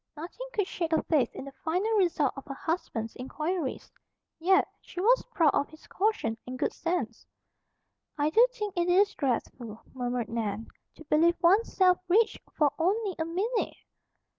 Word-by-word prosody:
Nothing 355 +11 -7
could 415 -5 0
shake 340 -3 -3
her 315 - +2
faith 280 -8 +2
in - - -7
the 275 - -8
final 365 +7 0
result 340 -8 +2
of 275 - -9
her 275 - -5
husband's 260 -9 -3
inquiries. 305 +4 -3 0.5
Yet, 380 +4 +4
she - - -9
was 480 +7 +4
proud 325 -9 +3
of 285 - 0
his 315 +1 -16
caution 380 - -1
and 255 +1 -5
good - - -1
sense. 295 -10 -3 0.9
"I 295 +1 +1
do 465 +7 +6
think 420 -5 -5
it 350 0 +1
is 400 +3 +4
dreadful," 240 -4 -3
murmured 245 -3 -2
Nan, 225 -1 -3 0.3
"to - - -13
believe 330 +4 +3
one's 390 +7 +4
self 365 -2 +5
rich 430 +5 +3
for 295 -3 +2
only 395 +4 +1
a 320 - 0
minute!" 405 +8 -1
330 Hz, 165 wpm, -29 LUFS, 265-380 Hz, 0.9 s, do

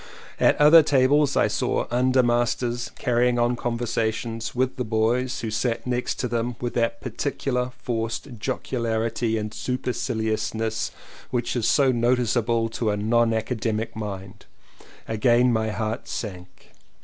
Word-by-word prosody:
At - - +4
other 150 +3 +9
tables 145 0 +3
I - - +4
saw - - 0
*'undermasters" 120 -1 +1
carrying 125 -1 +1
on 120 +1 +2
conversations 115 -1 -2
with 130 +1 0
the 125 - -1
boys 120 +3 0
who 115 -1 -3
sat 115 +1 -1
next 125 0 -1
to 125 - -1
them 120 0 -2
with 120 -1 -3
that 115 -1 0
particular 125 0 -2
forced 115 +1 -3
jocularity 115 0 -1
and 105 0 -4
super 125 0 -2
ciliousness 110 0 -2 0.4
which 120 0 -1
is 120 -3 +1
so 135 -2 +4
noticeable 120 -1 +1
to 115 0 -2
a 105 - 0
non 115 +2 +2
academic 110 -1 -2
mind 100 -2 -7 0.3
— - - -21
again 120 +2 +3
my 110 -1 0
heart 110 +2 -3
sank. 90 -4 -7
120 Hz, 135 wpm, -24 LUFS, 110-125 Hz, 0.4 s, other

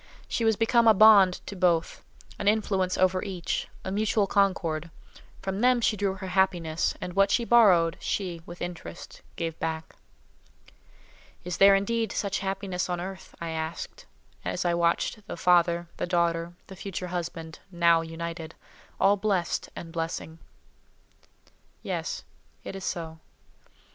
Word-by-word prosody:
She 235 - -2
was 225 -1 +3
become 230 +2 +3
a 220 - +7
bond 200 -3 +7
to 200 - -7
both, 175 -3 +1 0.4
an - - -2
influence 195 -3 +1
over 185 0 +2
each, 185 -5 -3 0.2
a 190 - -3
mutual 210 +1 +1
concord. 175 -5 0 0.5
From 195 +1 -2
them 250 0 +4
she 225 -1 +2
drew 200 -1 -1
her 190 -1 -7
happiness, 175 -4 +1
and 180 - -5
what 195 +1 +4
she 235 - +1
borrowed, 185 -9 +5
she, 180 -4 -3
with 175 0 -7
interest, 170 - -8
gave 165 -1 -4
back. 160 0 -4 1.5
"Is 180 0 -4
there, 195 0 +7
indeed, 225 +2 0
such 200 -1 -1
happiness 190 -1 -3
on 175 -1 -1
earth?" 190 +2 -8
I 170 -1 -4
asked, 160 +1 -5 0.4
as - - -2
I 175 - +2
watched 170 +5 0
the - - -6
father, 170 0 +3
the - - -2
daughter, 170 -1 0
the 190 - -11
future 185 -1 -5
husband, 165 -2 -5
now 170 -2 +4
united—all 165 +4 -3
blessed 195 -4 -1
and 165 - -8
blessing. 165 -1 -4 1.4
Yes; - - -3 0.4
it - - -7
is 195 - -6
so. 160 -2 -4
180 Hz, 145 wpm, -27 LUFS, 170-195 Hz, 1.5 s, a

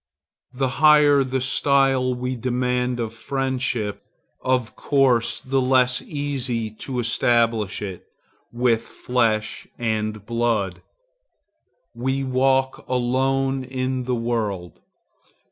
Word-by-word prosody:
The 135 +1 -1
higher 150 -2 +6
the 130 0 -2
style 135 -1 +2
we 125 +1 -3
demand 125 0 -1
of 115 -1 -3
friendship, 130 -4 -2 0.4
of 125 -3 0
course 130 -5 +2
the 135 +1 0
less 125 -1 +3
easy 130 -6 -3
to 125 +4 -6
establish 115 -3 +1
it 95 -3 -7 0.4
with 120 -1 +2
flesh 115 -2 -1
and 110 -2 -2
blood. 115 -5 -1 1.1
We 130 +3 -1
walk 130 0 +1
alone 135 +2 0
in 130 0 -3
the 125 0 0
world. 110 -7 -3
125 Hz, 100 wpm, -23 LUFS, 115-130 Hz, 1.1 s, higher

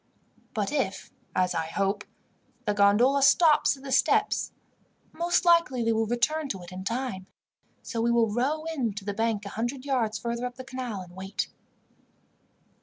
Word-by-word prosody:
"But 210 -2 -1
if, 235 -10 -2 0.2
as 185 0 +2
I 165 -1 -1
hope, 195 +4 -1 0.6
the 210 - +1
gondola 210 +7 +4
stops 300 0 +5
at 265 - -16
the 275 - -6
steps, - - +2 0.6
most 345 +3 +1
likely 335 -8 +4
they 230 0 +2
will 225 0 +1
return 290 +7 0
to 190 -5 -4
it 175 - -11
in 185 +1 -7
time. 230 -3 -3 0.6
So 230 - -3
we 235 - +2
will 230 -3 +2
row 285 +7 0
in 235 -8 -1
to 200 -1 -7
the 205 - -2
bank 225 -1 -1
a - - -5
hundred 240 +6 -3
yards 235 -6 0
farther 235 +3 -3
up 245 - -10
the 260 - -8
canal 255 -6 -5
and 180 -1 -12
wait." 190 +1 -4
230 Hz, 175 wpm, -27 LUFS, 200-265 Hz, 0.6 s, stops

